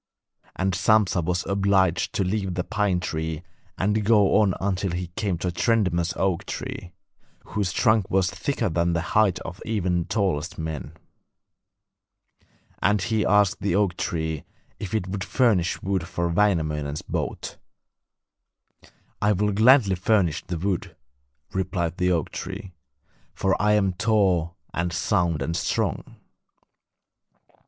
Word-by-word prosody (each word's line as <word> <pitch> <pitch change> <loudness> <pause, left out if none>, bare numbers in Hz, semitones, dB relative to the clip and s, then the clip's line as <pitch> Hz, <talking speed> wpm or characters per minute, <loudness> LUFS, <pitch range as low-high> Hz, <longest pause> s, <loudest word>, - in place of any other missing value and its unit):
And 95 0 0
Sampsa 100 -1 +3
was 90 +2 -1
obliged 95 -2 +2
to 100 - +1
leave 95 -1 -2
the 90 - -1
pine 105 -3 0
tree 80 -1 -3 0.3
and 105 +3 +1
go 105 -2 +4
on 95 -3 +2
until 95 0 -1
he 90 0 -3
came 100 -5 -1
to 90 +2 -2
a - - -3
tremendous 90 -4 +1
oak 95 -3 0
tree, 90 - -6 0.5
whose 100 -4 -2
trunk 110 -1 +2
was 95 -1 +2
thicker 110 +7 -2
than 85 0 +1
the 85 - 0
height 105 -4 +4
of 90 -1 -8
even 95 -5 0
the 85 - -2
tallest 95 -6 -1
men. 80 -4 -5 1.9
And 105 +1 +3
he 110 +1 0
asked 105 0 +3
the 100 -2 0
oak 100 -3 +2
tree 80 -3 -3 0.4
if 100 0 -4
it 95 -4 -1
would 95 0 -3
furnish 105 -8 +1
wood 95 -3 -1
for 85 0 -2
Wainamoinen's 80 -6 0
boat. - - -4 1.6
'I 105 +1 +3
will 105 +2 +1
gladly 110 0 +5
furnish 90 -3 +1
the 90 - -3
wood,' 90 +1 -2 0.6
replied 90 -3 -2
the 90 0 +2
oak 85 -4 0
tree, 95 -2 -7 0.6
'for 95 -1 +1
I 105 +1 +3
am 100 -3 +2
tall 90 -5 +1 0.2
and 85 +1 -1
sound 85 -4 0
and 85 +3 -2
strong. - - -2
95 Hz, 140 wpm, -25 LUFS, 85-105 Hz, 1.9 s, gladly